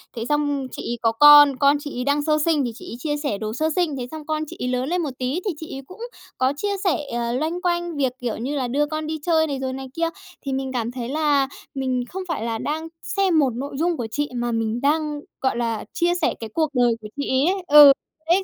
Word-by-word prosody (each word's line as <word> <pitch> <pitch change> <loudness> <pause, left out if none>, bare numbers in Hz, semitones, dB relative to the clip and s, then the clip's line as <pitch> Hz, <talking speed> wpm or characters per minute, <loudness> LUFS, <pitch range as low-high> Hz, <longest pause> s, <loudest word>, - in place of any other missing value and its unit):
Thế 230 -1 -4
xong 290 -2 0
chị - - -6
ấy 240 - -2
có 225 - +3
con, 290 +3 +8
con 280 0 +4
chị 290 -3 -7
ấy 250 - -1
đang 285 +2 +1
sơ 305 0 +2
sinh 315 -4 +2
thì 240 - -2
chị - - -10
ấy - - -5
chia 295 +2 -2
sẻ 285 -9 -2
đồ 215 0 -4
sơ 310 +7 0
sinh. 335 -6 0
Thế 245 -1 -4
xong 315 -1 -8
con 310 0 -1
chị - - -10
ấy 250 - -2
lớn 255 +3 -1
lên 360 0 0
một 300 -4 -2
tí 260 +7 -1
thì 400 - +1
chị 320 - -7
ấy 270 - -6
cũng 370 +5 -13 0.4
có 260 +1 +2
chia 405 +4 -1
sẻ, 370 -6 +2 0.2
ờ, 235 0 -1
loanh 315 +7 -2
quanh 345 -2 -1
việc, 265 -3 +1
kiểu 240 -3 -3
như 265 +6 -3
là, 260 -3 -1
đưa 285 +5 +1
con 310 +1 -4
đi 315 0 -2
chơi 320 -2 +3
này, 280 -3 -3
rồi 260 -1 -3
này 265 0 -6
kia. 330 +1 0 0.4
Thì 275 - -2
mình 265 0 -2
cảm 235 -2 -2
thấy 245 -1 -5
là 290 -2 +2 0.3
mình 260 -2 -1
không 380 +1 -5
phải 315 -10 -3
là 230 -1 -2
đang 310 +7 -3 0.2
xem 380 -5 +2
một 275 -3 +3
nội 275 +3 -5
dung 335 +2 0
của 235 - -3
chị 290 +5 -1
mà 240 0 -1
mình 225 +1 -1
đang, 300 +1 +1 0.2
gọi 265 -2 0
là, 230 -3 -2
chia 350 0 +2
sẻ 305 - +2
cái 225 - -6
cuộc 315 -2 +1
đời 245 -2 +3
của 215 - -7
chị - - -3
ấy 275 +8 +3
ấy. 390 - -5
Ừ, 295 -1 +10 0.4
đấy, 380 +3 +4
285 Hz, 270 wpm, -22 LUFS, 250-315 Hz, 0.4 s, Ừ